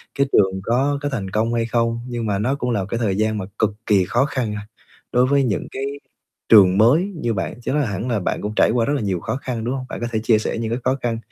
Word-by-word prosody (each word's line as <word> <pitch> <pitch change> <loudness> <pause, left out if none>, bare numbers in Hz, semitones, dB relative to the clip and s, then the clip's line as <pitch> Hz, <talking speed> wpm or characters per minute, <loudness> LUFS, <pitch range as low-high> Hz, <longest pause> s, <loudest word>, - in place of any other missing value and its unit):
cái 140 0 +2
trường 95 -1 +3
có 135 +5 +1
có 145 - -1
thành 105 -9 -3
công 110 +4 0
hay 115 -1 0
không. 115 0 0
Nhưng 120 -2 -3
mà 100 -2 0
nó 130 +6 0
cũng 125 -3 -3
là 105 - 0
một 95 - -3
cái 115 - -2
thời 105 -5 0
gian 110 0 +1
mà 95 - -3
cực 110 - +3 0.2
kỳ 95 -3 +3
khó 120 +7 +2
khăn 130 -7 -2
nha, 105 0 -6 0.4
đối 125 0 +4
với 140 +1 +3
những 110 -8 -1
cái 135 - -4 0.7
trường 95 -3 +7
mới 155 - +4
như 120 -7 -1
bạn, 105 +4 -4
chắc 135 - -2
là 145 - +1
hẳn 105 +3 -3
là 115 -4 0
bạn - - -2
cũng 105 +1 -3
trải - - +4
qua 115 0 +1
rất 145 - 0
là - - -1
nhiều 95 -4 -1
khó 110 +5 -3
khăn, 125 -4 -4
đúng 125 +3 -1
hông? 130 - -4
Bạn - - -6
có 120 - -2
thể 110 - +1
chia 110 -1 +4
sẻ 110 - -3
những 115 -1 -3
cái 120 - -1
khó 130 +1 +2
khăn 115 -2 -1
115 Hz, 290 wpm, -21 LUFS, 105-125 Hz, 0.7 s, trường